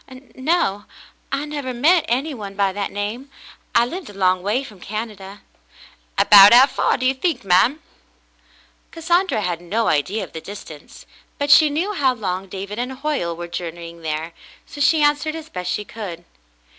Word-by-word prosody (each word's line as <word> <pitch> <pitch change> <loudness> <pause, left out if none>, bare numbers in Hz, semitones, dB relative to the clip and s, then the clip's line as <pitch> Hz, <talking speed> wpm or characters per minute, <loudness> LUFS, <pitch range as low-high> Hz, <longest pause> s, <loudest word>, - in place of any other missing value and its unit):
" 265 +1 -20
*'No, 260 - 0 0.5
I 275 +2 -1
never 290 -4 -5
met 320 +6 +3
any 275 +6 -1
one 200 -5 -8
by 195 -1 +1
that 200 0 -3
name. 215 +7 -5 0.5
I 235 - +5
live 345 - -7
a - - -11
long 185 -2 +1
way 210 +8 -1
from 215 -8 -13
Canada." 205 -1 -7 0.8
''About 205 +1 +8
'ow 250 +2 +9
far 275 - 0
do 255 - -3
you 260 - +3
think, 320 +5 -2
ma'm.^*" 195 +9 +3 1.1
Cassandra 345 - 0
had 175 -3 -3
no 210 +6 -1
idea 185 +9 0
of - - -11
the 160 - -6
distance, 160 -7 -11 0.3
but 285 -1 0
she 310 0 +7
knew 340 +8 -2
how 270 -8 +1
long 190 -3 -4
David 195 +3 -6
and 250 +2 -3
Hoyle 265 - -2
were 175 +1 -7
journeying 170 -1 -7
there, 160 +1 -4 0.3
so 290 - -9
she 305 +1 +4
answered 295 +2 +1
as 315 -1 -8
best 180 0 -4
she 210 - -3
could. 180 -7 -8
215 Hz, 175 wpm, -21 LUFS, 185-285 Hz, 1.1 s, ow